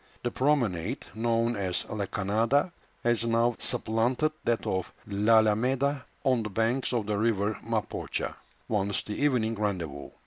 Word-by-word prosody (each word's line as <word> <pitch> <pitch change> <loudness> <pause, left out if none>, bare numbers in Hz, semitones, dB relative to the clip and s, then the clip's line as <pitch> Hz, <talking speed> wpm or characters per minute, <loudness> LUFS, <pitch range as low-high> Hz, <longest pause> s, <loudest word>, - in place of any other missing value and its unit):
The 120 - -1
promenade, 125 - 0
known 115 +1 +1
as 95 -3 -1
La 105 -2 -3
Cañada, 110 - +1 0.3
has 120 -1 +2
now 115 +1 +2
supplanted 120 +7 +1
that 120 -1 +1
of 95 -1 -1
L'Alameda 115 +6 +3 0.2
on 130 -4 +3
the 105 - -4
banks 115 +6 0
of 120 -4 0
the 105 -1 -1
river 110 -2 +1
Mapocha, 110 -1 -2 0.3
once 100 -2 0
the 105 - -5
evening 125 -4 +1
rendezvous. 90 -10 -3
115 Hz, 135 wpm, -28 LUFS, 105-120 Hz, 0.3 s, L'Alameda